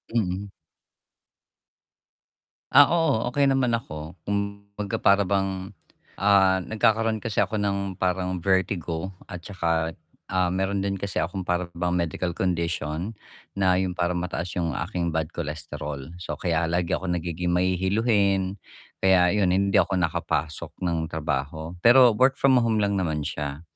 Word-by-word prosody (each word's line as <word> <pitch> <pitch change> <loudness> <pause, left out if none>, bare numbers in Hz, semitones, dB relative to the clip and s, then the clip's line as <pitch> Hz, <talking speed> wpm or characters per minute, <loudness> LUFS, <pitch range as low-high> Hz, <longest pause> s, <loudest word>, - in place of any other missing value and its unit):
Mm. 100 -2 -1 2.2
Ah, 145 - +9
oo, 160 -9 +1
okey 140 +1 +3
naman 135 -3 +2
ako, 80 -7 -5
kumbaga 100 0 -3
para 100 +1 +4
bang 95 0 -1 0.5
ah, 95 -1 +4
nagkakaroon 110 +2 +1
kasi 105 - -2
ako 110 - +1
ng 100 -2 -1
parang 90 0 -1
vertigo. 95 -2 0 0.2
At 90 - -5
tsaka, 85 -4 -1 0.3
ah, 90 -1 +1
mayro'n 95 +1 -1
din 100 0 -1
kasi 100 -2 -5
akong 90 +2 -4
para 90 0 0
bang 90 +1 -2
medical 85 0 -1
condition, 85 +1 -2 0.4
na 95 -2 +3
'yong 95 -1 -1
parang 90 0 0
mataas 90 0 -3
'yong 85 -1 -1
aking 85 -2 -3
bad 80 -1 -1
cholesterol. 75 -3 -6
So 90 - -5
kaya 85 -2 0
lagi 85 0 -1
akong 90 -2 -1
nagiging 85 +1 -2
mahihiluhin, 95 +1 +1 0.4
kaya 90 -2 +4
'yon 100 -3 +2
hindi 100 0 +2
ako 100 - +1
nakapasok 80 -3 -2
ng 85 -2 0
trabaho. 80 0 -3
Pero 120 0 +8
work-from-home 130 -4 +3
lang 100 -1 +1
naman 80 -4 -1
siya. 75 0 -4
95 Hz, 135 wpm, -25 LUFS, 85-100 Hz, 2.2 s, Ah